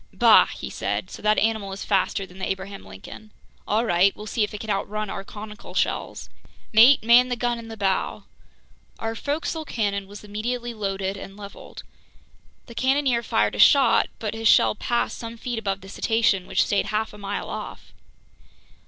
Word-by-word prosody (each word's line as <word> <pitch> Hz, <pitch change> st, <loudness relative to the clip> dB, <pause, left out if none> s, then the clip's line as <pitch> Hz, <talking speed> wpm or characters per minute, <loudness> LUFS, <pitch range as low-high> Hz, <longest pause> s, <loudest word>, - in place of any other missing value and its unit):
"Bah!" -, -, +6 dB
he -, -, -7 dB
said. -, -, -3 dB
"So -, -, -9 dB
that 215 Hz, 0 st, +2 dB
animal 220 Hz, -3 st, 0 dB
is 195 Hz, -, -6 dB
faster 195 Hz, 0 st, 0 dB
than 185 Hz, 0 st, -15 dB
the 190 Hz, -, -3 dB
Abraham 195 Hz, +1 st, -5 dB
Lincoln. 100 Hz, -, -12 dB, 0.4 s
All 220 Hz, +3 st, +1 dB
right, 185 Hz, 0 st, +3 dB
we'll 210 Hz, -, -9 dB
see 215 Hz, +1 st, 0 dB
if 210 Hz, -, -2 dB
it 210 Hz, -, -7 dB
can 220 Hz, -, -3 dB
outrun 210 Hz, +1 st, -2 dB
our 195 Hz, -, -5 dB
conical 210 Hz, +2 st, -10 dB
shells! -, -, -2 dB, 0.5 s
Mate, 235 Hz, +5 st, +7 dB
man 240 Hz, +2 st, +6 dB
the 245 Hz, -, 0 dB
gun 240 Hz, 0 st, -1 dB
in 230 Hz, -, -10 dB
the 225 Hz, 0 st, -8 dB
bow!" 195 Hz, -2 st, -1 dB, 0.7 s
Our 225 Hz, 0 st, -3 dB
forecastle 305 Hz, +6 st, -3 dB
cannon 200 Hz, -8 st, -2 dB
was 205 Hz, +1 st, -11 dB
immediately 235 Hz, +4 st, -4 dB
loaded 195 Hz, -2 st, -3 dB
and 195 Hz, +1 st, -10 dB
leveled. 200 Hz, -1 st, -10 dB, 0.8 s
The 235 Hz, -, -12 dB
cannoneer 260 Hz, 0 st, +1 dB
fired 105 Hz, -, +1 dB
a 105 Hz, -, -6 dB
shot, 270 Hz, -, +6 dB
but 215 Hz, -1 st, -4 dB
his 225 Hz, 0 st, -1 dB
shell -, -, +5 dB
passed 235 Hz, +3 st, -2 dB
some 230 Hz, 0 st, -7 dB
feet 240 Hz, 0 st, -4 dB
above 195 Hz, -2 st, -3 dB
the 195 Hz, -, -12 dB
cetacean, 220 Hz, -4 st, +1 dB
which -, -, +2 dB
stayed 200 Hz, -, 0 dB
half 215 Hz, 0 st, -2 dB
a 210 Hz, -, -12 dB
mile 200 Hz, 0 st, -4 dB
off. -, -, -8 dB
215 Hz, 185 wpm, -24 LUFS, 195-235 Hz, 0.8 s, Mate